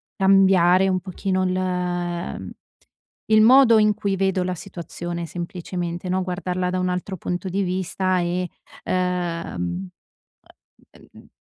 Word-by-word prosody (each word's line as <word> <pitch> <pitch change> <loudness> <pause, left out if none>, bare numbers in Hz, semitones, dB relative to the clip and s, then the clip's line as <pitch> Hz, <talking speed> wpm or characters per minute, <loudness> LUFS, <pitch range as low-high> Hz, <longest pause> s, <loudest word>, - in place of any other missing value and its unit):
cambiare 190 -1 +5
un 185 -1 0
pochino 185 +1 -2
il 180 -1 -2 0.8
il 215 0 +7
modo 240 0 +7
in 210 0 +4
cui 200 -2 -2
vedo 190 -1 +1
la 185 0 -2
situazione, 170 -1 -6
semplicemente, 175 0 -5
no, 185 +1 +1
guardarla 180 0 -2
da 185 - -1
un 185 0 0
altro 180 +2 -3
punto 180 +2 -4
di 195 +2 0
vista 185 0 -1
e, 175 +1 -1 0.3
ehm, 170 - -2 1.3
uhm, - - -16
180 Hz, 120 wpm, -23 LUFS, 175-190 Hz, 1.3 s, il